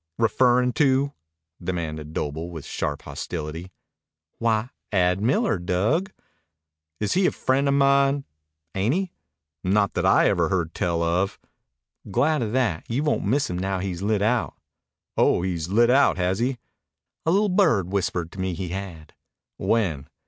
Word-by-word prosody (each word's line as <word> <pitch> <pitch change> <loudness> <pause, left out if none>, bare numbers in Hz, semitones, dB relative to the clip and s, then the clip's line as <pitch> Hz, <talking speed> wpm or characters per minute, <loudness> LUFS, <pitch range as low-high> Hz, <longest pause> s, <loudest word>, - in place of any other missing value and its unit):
"Referrin' 125 +2 +3
to?" 140 -1 +2 0.5
demanded 80 -4 -4
Doble 80 +2 -3
with 80 -4 -8
sharp 75 -1 -3
hostility. 80 +2 -6 0.7
"Why, 115 +1 +1 0.2
Ad 90 -1 +2
Miller, 135 - +1
Dug." 110 - 0 0.9
"Is 105 -2 0
he 185 0 +3
a - - +1
friend 135 +2 +1
of 140 - +3
mine?" 140 0 +3 0.5
"Ain't 105 +9 +1
he?" 190 -1 -2 0.5
"Not 100 +2 +2
that - - -1
I - - +5
ever - - +2
heard 85 -4 -1
tell 85 -1 0
of." 90 +4 0 0.7
"Glad 145 +9 +2
of 110 -3 -2
that. 115 -11 +1
You 125 +6 0
won't 150 - 0
miss 135 +8 +1
him 90 0 -3
now 95 +1 -1
he's 90 -1 -4
lit 105 0 +1
out." 115 +2 +1 0.6
"Oh, - - +3
he's 85 -3 -2
lit 115 +4 +4
out, 140 -4 +4
has 95 +2 0
he?" 125 +2 0 0.7
"A - - 0
li'l 205 +3 +3
bird 155 - +2
whispered 90 -4 -1
to 95 - -11
me 95 -1 -1
he 90 0 -4
had." 90 -4 -7 0.4
"When?" 85 -12 0
100 Hz, 155 wpm, -24 LUFS, 90-130 Hz, 0.9 s, I